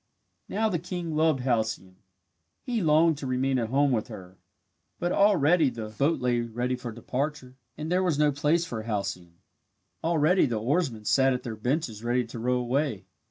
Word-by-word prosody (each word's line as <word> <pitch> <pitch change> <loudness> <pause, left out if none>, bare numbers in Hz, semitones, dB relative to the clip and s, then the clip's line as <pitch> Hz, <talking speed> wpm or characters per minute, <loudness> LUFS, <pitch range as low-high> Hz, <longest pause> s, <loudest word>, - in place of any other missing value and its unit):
Now 220 +2 +1
the 180 -6 -1
king 175 -2 -5
loved 155 -4 +2
Halcyone. 110 -7 -1 0.7
He 240 -3 -1
longed 160 -1 +3
to 135 - -5
remain 130 +1 0
at 115 -2 -2
home 140 +2 +2
with 110 -4 0
her. 90 0 -11 0.6
But 175 0 -1
already 175 -6 +4
the 115 -3 -6
boat 140 +10 0
lay 125 -1 +1
ready 120 +2 -2
for 125 -1 -6
departure 130 +3 -4 0.2
and 155 +2 -5
there 180 +1 +3
was 175 -6 +1
no 150 0 +3
place 150 +4 +1
for 115 -8 -5
Halcyone. 100 -6 -4 0.7
Already 165 +2 +3
the 115 -3 -2
oarsmen 125 -3 -1
sat 135 +3 +3
at 125 - -4
their 115 -2 -5
benches 115 -1 -2
ready 120 +1 +1
to 115 +1 -8
row 125 +2 +1
away. 125 -4 -1
130 Hz, 175 wpm, -27 LUFS, 115-155 Hz, 0.7 s, already